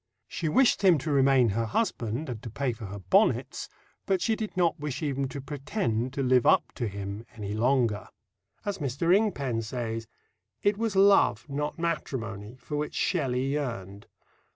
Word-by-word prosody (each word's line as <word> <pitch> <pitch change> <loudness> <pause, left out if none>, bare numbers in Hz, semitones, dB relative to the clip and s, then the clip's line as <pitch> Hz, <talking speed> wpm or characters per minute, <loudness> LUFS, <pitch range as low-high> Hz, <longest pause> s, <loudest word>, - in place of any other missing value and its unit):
She 160 - -2
wished 255 - +4
him 180 -4 +6
to 150 +2 -3
remain 135 -3 +4
her 115 +3 -1
husband 125 - -1
and 120 -4 -5
to 115 - -7
pay 125 +3 -1
for 110 -2 -8
her 100 +1 -7
bonnets, 95 -2 +1 0.4
but 190 -1 +2
she 220 +4 +1
did 215 -3 -5
not 170 -2 +2
wish 145 0 -4
even 140 -2 -1
to 140 - -6
pretend 135 - -2
to 140 - -1
"live 125 -1 +4
up - - +4
to 120 - -1
him" 100 +1 -5
any 105 -2 -5
longer. 120 -2 +1 0.6
As 200 -2 -2
Mr. 150 +5 +2
Ingpen 140 - 0
says, 115 -1 -4 0.6
"it 205 0 +3
was 220 -1 -2
love, 195 - +4
not 145 +1 -3
matrimony," 120 -10 -3
for 145 +3 -5
which 150 0 -3
Shelley 130 -7 0
yearned. 105 -9 -4
135 Hz, 170 wpm, -28 LUFS, 115-160 Hz, 0.6 s, him